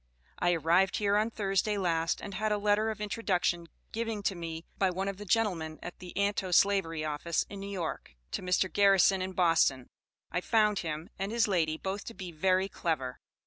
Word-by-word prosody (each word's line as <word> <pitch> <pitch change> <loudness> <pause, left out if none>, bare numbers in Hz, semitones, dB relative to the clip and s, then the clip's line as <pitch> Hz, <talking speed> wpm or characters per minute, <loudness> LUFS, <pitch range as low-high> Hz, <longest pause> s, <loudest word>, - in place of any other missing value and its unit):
I 175 0 +3
arrived 175 +4 +3
hear 205 -1 +2
on 215 +2 +2
Thirsday 205 -1 0
last, 165 -3 0
and 200 - -7
had 215 +3 -1
a 210 - +2
lettor 210 +1 +2
of 220 - -3
intoduction 190 -5 -1 0.2
giving 225 -2 -3
to 195 - +1
me 165 -2 -6
by 190 - +3
one 190 +2 -2
of 195 -1 -3
the 205 - -8
gentlemen 175 -7 0
at 175 - -8
the 180 -1 -9
Antoslavery 195 -4 +2
office 155 +2 -1
in 200 - -6
New 200 0 -6
York, 170 - -5 0.2
to - - -3
Mr. 185 +1 +2
Garrison 195 -1 +5
in 185 0 -3
Boston, 165 -8 +3 0.5
I 180 - -1
found 210 -1 +2
him 160 0 -5
and 195 +2 -2
his 230 -1 +2
lady 160 -5 +1
both 195 +4 -4
to 230 - -8
bee 180 -2 -7
very 185 +4 +2
clever. 155 -9 -2
190 Hz, 190 wpm, -30 LUFS, 170-205 Hz, 0.5 s, Garrison